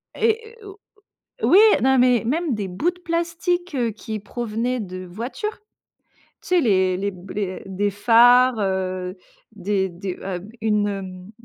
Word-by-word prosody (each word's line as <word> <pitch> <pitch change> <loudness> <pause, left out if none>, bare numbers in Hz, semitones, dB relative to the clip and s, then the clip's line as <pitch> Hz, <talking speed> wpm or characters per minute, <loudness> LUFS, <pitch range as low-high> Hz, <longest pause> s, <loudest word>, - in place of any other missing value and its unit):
Et 450 0 0
et - - -17
au 395 +1 -11 0.6
oui, 370 - +6 0.3
non 265 0 +4
mais 245 -2 +4
même 310 +2 0
des 200 -2 -3
bouts 200 - -1
de 360 - -20
plastique, 340 0 -2
heu, 240 -3 +1
qui 220 0 -6
provenaient 240 +3 -3
de 185 -2 -6
voitures. 240 - -5 0.8
Tu - - -13
sais 360 -1 +4
les 190 -6 +2
les 200 +1 -1
b 185 0 -13
les 195 -3 -3
des 200 +2 -1
phares, 245 +3 +5
heu, 185 -1 -2 0.4
des 195 -1 -1
des 180 +1 -6
heu 185 -2 -3
b 210 +4 -13
une, 210 -2 +2
hem 185 -1 -7
215 Hz, 165 wpm, -22 LUFS, 190-265 Hz, 0.8 s, oui